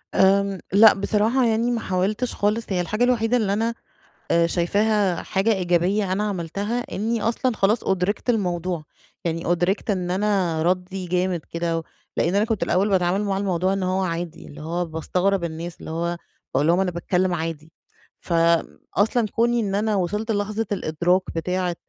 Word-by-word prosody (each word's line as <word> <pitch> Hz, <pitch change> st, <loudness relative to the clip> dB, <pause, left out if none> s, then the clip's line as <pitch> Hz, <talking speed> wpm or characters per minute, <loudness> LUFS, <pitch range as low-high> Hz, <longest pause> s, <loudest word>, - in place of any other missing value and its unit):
آمم، 195 Hz, 0 st, +3 dB
لأ 215 Hz, +1 st, +8 dB
بصراحة 220 Hz, +6 st, +1 dB
يعني 230 Hz, +1 st, +1 dB
ما 235 Hz, -, 0 dB
حاولتش 200 Hz, +7 st, -1 dB
خالص، 215 Hz, +3 st, 0 dB
هي 185 Hz, -3 st, +1 dB
الحاجة 215 Hz, +7 st, -1 dB
الوحيدة 245 Hz, -1 st, +2 dB
اللي 205 Hz, -4 st, +1 dB
أنا 225 Hz, +3 st, 0 dB, 0.6 s
آآ 170 Hz, 0 st, +4 dB
شايفاها 200 Hz, +2 st, +1 dB
حاجة 195 Hz, +4 st, +1 dB
إيجابية 185 Hz, +1 st, +1 dB
أنا 205 Hz, +2 st, 0 dB
عملتها 200 Hz, +6 st, -2 dB
إني 225 Hz, +3 st, -1 dB
أصلًا 230 Hz, +2 st, 0 dB
خلاص 210 Hz, +4 st, +2 dB
أُدرِكت 190 Hz, +5 st, -1 dB
الموضوع، 180 Hz, -6 st, 0 dB, 0.4 s
يعني 165 Hz, 0 st, -1 dB
أُدرِكت 175 Hz, +5 st, 0 dB
إن 180 Hz, -3 st, 0 dB
أنا 185 Hz, -5 st, +1 dB
ردي 180 Hz, +1 st, -1 dB
جامد 180 Hz, 0 st, 0 dB
كده، 165 Hz, -1 st, -1 dB, 0.3 s
لأن 175 Hz, +4 st, +1 dB
أنا 205 Hz, -, +3 dB
كنت 225 Hz, -3 st, -1 dB
الأول 190 Hz, +4 st, +1 dB
باتعامل 190 Hz, +1 st, +2 dB
مع 195 Hz, -1 st, -1 dB
الموضوع 190 Hz, -1 st, 0 dB
إن 195 Hz, -, -1 dB
هو 185 Hz, +1 st, 0 dB
عادي 170 Hz, -2 st, -4 dB
اللي 150 Hz, -, -11 dB
هو 170 Hz, +3 st, -2 dB
باستغرب 180 Hz, +4 st, 0 dB
الناس 165 Hz, +1 st, -5 dB
اللي -, -, -8 dB
هو، 170 Hz, +1 st, -2 dB, 0.4 s
باقول 140 Hz, +4 st, +2 dB
لهم 175 Hz, +2 st, +4 dB
أنا 190 Hz, -2 st, +1 dB
باتكلم 180 Hz, +1 st, 0 dB
عادي. 165 Hz, -1 st, -4 dB, 0.5 s
ف 175 Hz, -, -4 dB, 0.6 s
أصلًا 220 Hz, +2 st, +2 dB
كوني 240 Hz, +1 st, +2 dB
إن 200 Hz, -3 st, -1 dB
أنا 210 Hz, +1 st, +1 dB
وصلت 210 Hz, +4 st, -1 dB
للحظة 210 Hz, +2 st, -1 dB
الإدراك 180 Hz, 0 st, +1 dB
بتاعة 180 Hz, +1 st, -1 dB
190 Hz, 165 wpm, -23 LUFS, 175-210 Hz, 0.6 s, لأ